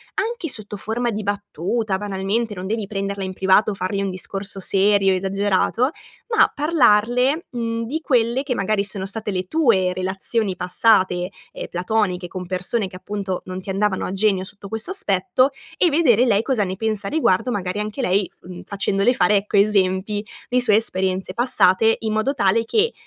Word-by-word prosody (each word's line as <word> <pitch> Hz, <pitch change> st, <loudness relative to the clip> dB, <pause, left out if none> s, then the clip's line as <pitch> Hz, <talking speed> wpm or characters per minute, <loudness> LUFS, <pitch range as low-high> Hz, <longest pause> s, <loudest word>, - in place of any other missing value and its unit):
anche 425 Hz, -5 st, -2 dB
sotto 210 Hz, -4 st, -4 dB
forma 235 Hz, +4 st, -2 dB
di 215 Hz, 0 st, -4 dB
battuta, 205 Hz, +1 st, -2 dB
banalmente, 205 Hz, +3 st, -2 dB
non 185 Hz, 0 st, -6 dB
devi 220 Hz, 0 st, -2 dB
prenderla 200 Hz, -1 st, -3 dB
in 190 Hz, 0 st, -4 dB
privato 190 Hz, +3 st, +3 dB
o -, -, -3 dB
fargli 195 Hz, +1 st, -2 dB
un 195 Hz, -, -2 dB
discorso 195 Hz, +2 st, -3 dB
serio, 195 Hz, +1 st, +3 dB
esagerato, 195 Hz, +6 st, +1 dB, 0.5 s
ma -, -, +5 dB
parlarle, 265 Hz, -1 st, +2 dB
mhmm, 230 Hz, -2 st, -3 dB
di 300 Hz, +8 st, -3 dB
quelle 245 Hz, -3 st, +1 dB
che 275 Hz, -3 st, -2 dB
magari 200 Hz, 0 st, 0 dB
sono 195 Hz, -1 st, -2 dB
state 210 Hz, +1 st, -3 dB
le 185 Hz, -1 st, -2 dB
tue 195 Hz, -, +2 dB
relazioni 190 Hz, +2 st, -2 dB
passate, 180 Hz, -1 st, +2 dB, 0.2 s
ehm, -, -, -6 dB
platoniche, 180 Hz, 0 st, -1 dB
con 180 Hz, +1 st, -7 dB
persone 185 Hz, +4 st, -1 dB
che 185 Hz, -, -13 dB
appunto 195 Hz, -1 st, -4 dB
non 185 Hz, 0 st, -6 dB
ti 190 Hz, -, -10 dB
andavano 195 Hz, 0 st, 0 dB
a -, -, -4 dB
genio 195 Hz, -1 st, +1 dB
sotto 200 Hz, 0 st, -9 dB
questo 220 Hz, -, -3 dB
aspetto, 255 Hz, -, +2 dB, 0.3 s
e 355 Hz, -, +4 dB
vedere 265 Hz, -7 st, +4 dB
lei 215 Hz, -3 st, +2 dB
cosa 250 Hz, -5 st, +1 dB
ne 185 Hz, -1 st, -3 dB
pensa 220 Hz, +1 st, -1 dB
a -, -, -2 dB
riguardo, 255 Hz, -7 st, +1 dB
magari 195 Hz, -2 st, -3 dB
anche 210 Hz, +5 st, -4 dB
lei 195 Hz, -4 st, +1 dB
f -, -, -26 dB
mhmm, 180 Hz, -1 st, -9 dB
facendole 200 Hz, +3 st, +1 dB
fare, 205 Hz, +1 st, +3 dB
ecco, 200 Hz, +1 st, -1 dB
esempi 200 Hz, 0 st, +1 dB, 0.3 s
di 250 Hz, 0 st, +2 dB
sue 215 Hz, -4 st, +5 dB
esperienze 190 Hz, -3 st, -1 dB
passate 225 Hz, -2 st, +3 dB
in 220 Hz, -1 st, -2 dB
modo 220 Hz, +6 st, 0 dB
tale 225 Hz, -1 st, +2 dB
che, 445 Hz, -, +1 dB
205 Hz, 180 wpm, -21 LUFS, 190-230 Hz, 0.5 s, ma